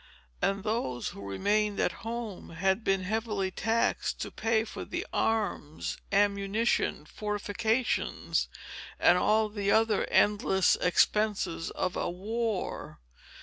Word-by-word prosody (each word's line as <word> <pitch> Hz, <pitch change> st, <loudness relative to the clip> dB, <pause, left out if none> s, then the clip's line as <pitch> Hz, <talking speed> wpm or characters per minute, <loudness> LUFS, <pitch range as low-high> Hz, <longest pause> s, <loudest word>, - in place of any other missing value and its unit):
And 195 Hz, 0 st, 0 dB
those, 210 Hz, -, -1 dB
who -, -, -10 dB
remained 205 Hz, -, 0 dB
at -, -, +2 dB
home, 225 Hz, -4 st, -5 dB
had 190 Hz, +6 st, 0 dB
been 195 Hz, -2 st, +1 dB
heavily 210 Hz, -1 st, -1 dB
taxed 225 Hz, +4 st, 0 dB
to -, -, -4 dB
pay 225 Hz, 0 st, +1 dB
for 225 Hz, -, -7 dB
the -, -, -4 dB
arms, 205 Hz, -9 st, -1 dB, 0.2 s
ammunition, 200 Hz, -3 st, +1 dB
fortifications, 215 Hz, +5 st, -1 dB, 0.5 s
and 175 Hz, +1 st, +5 dB
all 215 Hz, +3 st, +3 dB
the 205 Hz, -1 st, -2 dB
other 220 Hz, -1 st, +3 dB
endless 200 Hz, -2 st, +3 dB
expenses 180 Hz, -3 st, +1 dB
of 180 Hz, -, -2 dB
a -, -, -1 dB
war. 215 Hz, +3 st, -3 dB
205 Hz, 115 wpm, -29 LUFS, 190-220 Hz, 0.5 s, and